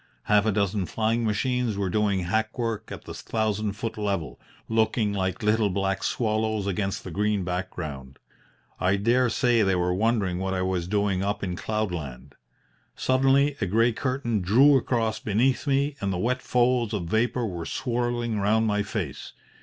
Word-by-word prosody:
Half 105 0 +3
a - - +3
dozen 100 -2 0
flying 115 +1 0
machines 115 +1 0
were 95 -2 -1
doing 100 -3 +1
hackwork 110 +4 -2
at - - -7
the - - -8
thousand 110 -2 -2
foot 110 +1 -5
level, 95 -12 -2 0.3
looking 110 -1 +1
like 95 +2 -2
little 105 0 +2
black 95 0 -1
swallows 110 -2 0
against 100 0 -2
the 90 - -7
green 105 +2 0
background. 80 -7 -5 0.6
I 95 +2 +2
dare 120 +5 +2
say 120 0 +2
they 95 -2 +2
were 90 0 +1
wondering 100 -3 +1
what 95 0 -2
I 90 - 0
was 90 -2 -1
doing 100 -1 0
up 100 +1 -2
in 90 -2 -2
cloud 110 +1 -2
land. 70 -8 -7 0.6
Suddenly 135 +2 +3
a 95 - +1
grey 115 +5 +3
curtain 120 -3 -1
drew 130 +11 +5
across 115 -4 0
beneath 120 +7 +1
me 140 +1 +1
and 100 -1 0
the 90 - -1
wet 125 +6 0
folds 120 -3 +1
of 100 - -2
vapour 115 +7 0
were 85 -5 -5
swirling 120 -2 -1
round 110 +3 +2
my 105 -1 +1
face. 100 - -5
105 Hz, 170 wpm, -26 LUFS, 95-115 Hz, 0.6 s, drew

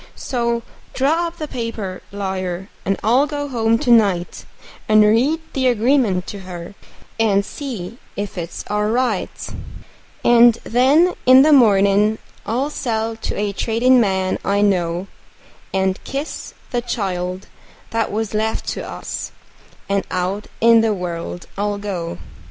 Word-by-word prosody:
So 235 -2 -1 0.3
draw 320 +6 +2
up 335 0 -9
the 305 - -4
paper, 230 -8 -5
lawyer, 190 -1 -4 0.2
and 195 - +1
I'll 250 +7 +4
go 290 -1 -3
home 230 -4 +1
to 245 - 0
night, 200 -7 +2 0.4
And 215 0 +7
read 250 +10 +3
the 260 -1 +1
agreement 235 -5 +2
to 200 - -7
her, 180 -1 -8 0.5
and 200 -3 +3
see 235 - -6 0.2
if 205 -1 -4
it's 170 -2 -5
all 210 0 0
right; 235 -3 0 1.0
And 240 -1 +7
then, 280 +9 +4
in 260 +1 +9
the 305 +1 +5
mornin', 210 -3 +4 0.3
I'll 260 +7 -1
sell 225 -5 -2
to - - -4
a 205 -1 -1
tradin' 240 +4 +3
man 190 -3 0
I 200 +1 +1
know, 180 -3 +1 0.7
And 190 0 0
kiss 280 +3 -5 0.2
the 245 - 0
child 185 -5 -3 0.5
that 225 -1 0
was 220 0 -2
left 220 +1 -1
to - - -3
us, - - -6 0.6
and 200 0 0
out 185 +3 -2
in 230 0 +6
the 220 -2 +1
world 175 -1 -5
I'll 205 0 0
go. 185 - -4
215 Hz, 140 wpm, -20 LUFS, 195-245 Hz, 1.0 s, in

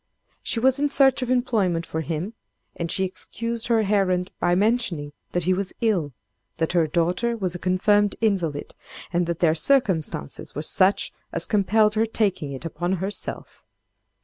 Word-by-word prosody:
She 230 - -2
was 265 +3 +3
in 290 0 +2
search 275 -1 +4
of 250 - -2
employment 215 -10 +1
for 160 - -3
him, 165 +7 -4 0.4
and 170 -1 -3
she 190 - +1
excused 230 +5 -4
her 230 -2 +3
errand 195 -3 +1
by 175 - +2
mentioning 190 -8 0 0.2
that 175 - 0
he 185 +3 +2
was 190 0 -3
ill, 195 - +1 0.5
that 160 0 0
her 170 -3 +2
daughter 180 +9 0
was 185 -5 -2
a 175 - -6
confirmed 205 +3 +2
invalid, 180 -10 -1 0.4
and 175 0 +1
that 170 -1 -3
their 165 -3 +4
circumstances 165 - 0
were 150 - -3
such 190 +5 +3 0.2
as 170 - -1
compelled 210 +1 +3
her 220 +1 +1
taking 195 -10 -1
it 135 +4 -7
upon 175 +3 -2
herself. 190 +3 -3
190 Hz, 165 wpm, -24 LUFS, 170-220 Hz, 0.5 s, search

